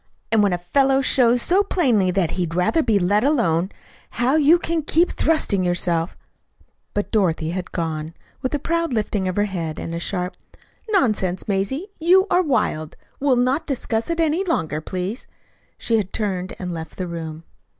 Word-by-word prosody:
And 225 Hz, -1 st, +4 dB
when 200 Hz, -2 st, +3 dB
a 175 Hz, -, 0 dB
fellow 270 Hz, +10 st, +2 dB
shows 245 Hz, -2 st, +4 dB
so 375 Hz, +3 st, +4 dB
plainly 255 Hz, -, +2 dB
that 180 Hz, -3 st, 0 dB
he'd 170 Hz, -3 st, -2 dB
rather 180 Hz, -, +2 dB
be 225 Hz, -8 st, +2 dB
let 200 Hz, +3 st, +2 dB
alone, 195 Hz, -, +2 dB, 0.5 s
how 245 Hz, +4 st, +2 dB
you 315 Hz, +2 st, +6 dB
can 335 Hz, -1 st, -1 dB
keep 330 Hz, +4 st, +2 dB
thrusting 270 Hz, -12 st, +1 dB
yourself 175 Hz, -1 st, 0 dB, 0.4 s
" -, -, -38 dB
But 205 Hz, -, -2 dB
Dorothy 165 Hz, -6 st, +1 dB
had 180 Hz, 0 st, -5 dB
gone. 160 Hz, -1 st, -3 dB, 0.3 s
With 260 Hz, +3 st, -1 dB
a -, -, +1 dB
proud 335 Hz, 0 st, -1 dB
lifting 210 Hz, -3 st, -1 dB
of 185 Hz, -, -2 dB
her 205 Hz, -, +2 dB
head, 170 Hz, -6 st, -4 dB
and 165 Hz, -, -5 dB
a 170 Hz, -, -3 dB
sharp 180 Hz, +1 st, -2 dB, 0.5 s
"Nonsense, 215 Hz, -, +1 dB
Mazie, 215 Hz, -, -1 dB
you 365 Hz, +4 st, +5 dB
are 360 Hz, -, +5 dB
wild! 155 Hz, -, -1 dB, 0.2 s
We'll 275 Hz, -2 st, +3 dB
not 255 Hz, +5 st, +1 dB
discuss 235 Hz, -4 st, -2 dB
it 335 Hz, 0 st, -1 dB
any 325 Hz, +3 st, +2 dB
longer, 160 Hz, -, -1 dB
please," 185 Hz, -, -4 dB, 0.5 s
she 230 Hz, -, +1 dB
had 200 Hz, -3 st, -2 dB
turned 190 Hz, -4 st, -2 dB
and 180 Hz, -2 st, -5 dB
left 160 Hz, -1 st, -7 dB
the 185 Hz, -, -3 dB
room. 165 Hz, -2 st, -6 dB
205 Hz, 180 wpm, -22 LUFS, 175-280 Hz, 0.5 s, you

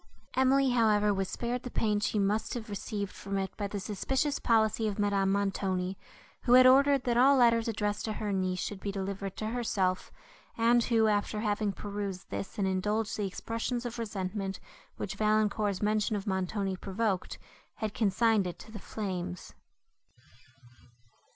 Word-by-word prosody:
Emily, 265 Hz, 0 st, +3 dB
however, 210 Hz, -3 st, +3 dB
was 195 Hz, -1 st, -2 dB
spared 240 Hz, +3 st, -3 dB
the 250 Hz, -, -6 dB
pain 210 Hz, -3 st, +1 dB
she 210 Hz, -, -1 dB
must 205 Hz, +4 st, 0 dB
have 220 Hz, -3 st, -6 dB
received 200 Hz, 0 st, -4 dB
from 195 Hz, 0 st, -5 dB
it 190 Hz, -1 st, -3 dB
by 205 Hz, -, -3 dB
the 205 Hz, 0 st, -4 dB
suspicious 265 Hz, +9 st, -1 dB
policy 220 Hz, -1 st, +2 dB
of 205 Hz, -, -3 dB
Madame 200 Hz, -2 st, +1 dB
Montoni, 195 Hz, -2 st, -1 dB, 0.5 s
who 240 Hz, -, +2 dB
had 255 Hz, 0 st, +9 dB
ordered, 275 Hz, +1 st, +6 dB
that 240 Hz, -1 st, +1 dB
all 270 Hz, +3 st, +6 dB
letters, 230 Hz, -2 st, +4 dB
addressed 210 Hz, -2 st, -1 dB
to 220 Hz, -, -2 dB
her 210 Hz, -1 st, -3 dB
niece, 185 Hz, -1 st, -1 dB
should 200 Hz, +1 st, -4 dB
be 200 Hz, -, -3 dB
delivered 195 Hz, 0 st, -4 dB
to 215 Hz, -, -3 dB
herself, 200 Hz, -6 st, -1 dB, 0.5 s
and 235 Hz, +1 st, +4 dB
who, 225 Hz, -2 st, +3 dB
after 210 Hz, 0 st, 0 dB
having 210 Hz, -1 st, 0 dB
perused 200 Hz, -2 st, -5 dB
this 195 Hz, -, -5 dB
and 200 Hz, -2 st, +1 dB
indulged 210 Hz, +4 st, 0 dB
the 205 Hz, -2 st, -1 dB
expressions 230 Hz, +5 st, -3 dB
of 240 Hz, 0 st, -5 dB
resentment, 195 Hz, -2 st, -3 dB, 0.4 s
which 195 Hz, -, -4 dB
Valancourt's 215 Hz, -2 st, +1 dB
mention 215 Hz, 0 st, +1 dB
of 200 Hz, -1 st, -4 dB
Montoni 190 Hz, 0 st, -1 dB
provoked, 195 Hz, 0 st, -2 dB, 0.4 s
had 215 Hz, -2 st, -3 dB
consigned 215 Hz, -1 st, +2 dB
it 175 Hz, -, -6 dB
to 220 Hz, -, -13 dB
the 215 Hz, -, -7 dB
flames. 185 Hz, -4 st, -5 dB
210 Hz, 165 wpm, -30 LUFS, 195-230 Hz, 0.5 s, had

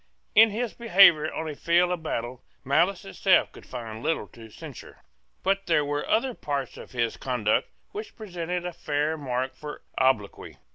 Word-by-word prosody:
In 225 Hz, +1 st, +8 dB
his 230 Hz, +3 st, -3 dB
behaviour 180 Hz, -8 st, +6 dB
on 160 Hz, -, -4 dB
a 155 Hz, -, -4 dB
field 175 Hz, +4 st, +2 dB
of 180 Hz, -2 st, -2 dB
battle 120 Hz, -5 st, -4 dB, 0.2 s
malice 175 Hz, +8 st, +2 dB
itself 95 Hz, -, +3 dB
could -, -, -14 dB
find 115 Hz, -3 st, -7 dB
little 160 Hz, -6 st, -1 dB
to 115 Hz, -1 st, -13 dB
censure: -, -, -11 dB, 0.4 s
but 195 Hz, 0 st, 0 dB
there 155 Hz, -4 st, +3 dB
were 145 Hz, 0 st, -2 dB
other 245 Hz, +3 st, +2 dB
parts 140 Hz, -, -3 dB
of -, -, -10 dB
his 120 Hz, -3 st, -1 dB
conduct 120 Hz, -5 st, 0 dB, 0.2 s
which 425 Hz, 0 st, -7 dB
presented 180 Hz, -4 st, -4 dB
a 180 Hz, -, -4 dB
fair 150 Hz, -1 st, -1 dB
mark 130 Hz, -3 st, -3 dB
for 150 Hz, -1 st, -8 dB, 0.2 s
obloquy. 130 Hz, -6 st, 0 dB
155 Hz, 165 wpm, -26 LUFS, 130-180 Hz, 0.4 s, In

